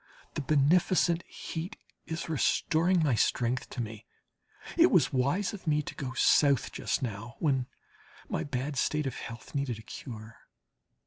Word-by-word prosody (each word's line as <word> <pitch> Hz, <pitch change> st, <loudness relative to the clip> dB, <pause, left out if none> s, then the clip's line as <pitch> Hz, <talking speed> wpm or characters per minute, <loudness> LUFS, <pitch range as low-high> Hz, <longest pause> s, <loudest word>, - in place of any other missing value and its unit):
The 150 Hz, -, -2 dB
beneficent 165 Hz, +4 st, +3 dB
heat 175 Hz, +7 st, -6 dB, 0.3 s
is 165 Hz, +1 st, -4 dB
restoring 165 Hz, +3 st, +2 dB
my 145 Hz, -5 st, +3 dB
strength 120 Hz, +2 st, +1 dB
to 125 Hz, -, -4 dB
me. 110 Hz, -1 st, -9 dB, 0.7 s
It -, -, +6 dB
was -, -, +3 dB
wise 140 Hz, +12 st, +1 dB
of 190 Hz, -4 st, -9 dB
me 150 Hz, -1 st, +2 dB
to -, -, -6 dB
go 130 Hz, -2 st, -5 dB
South 140 Hz, -1 st, +4 dB
just -, -, -1 dB
now, 115 Hz, 0 st, -5 dB
when 135 Hz, -5 st, +1 dB, 0.6 s
my -, -, -2 dB
bad 135 Hz, +1 st, -3 dB
state 150 Hz, +3 st, +1 dB
of 135 Hz, -, -2 dB
health 115 Hz, +1 st, -8 dB
needed 140 Hz, -5 st, -1 dB
a 110 Hz, -, -11 dB
cure. 110 Hz, -1 st, -9 dB
140 Hz, 150 wpm, -30 LUFS, 125-160 Hz, 0.7 s, It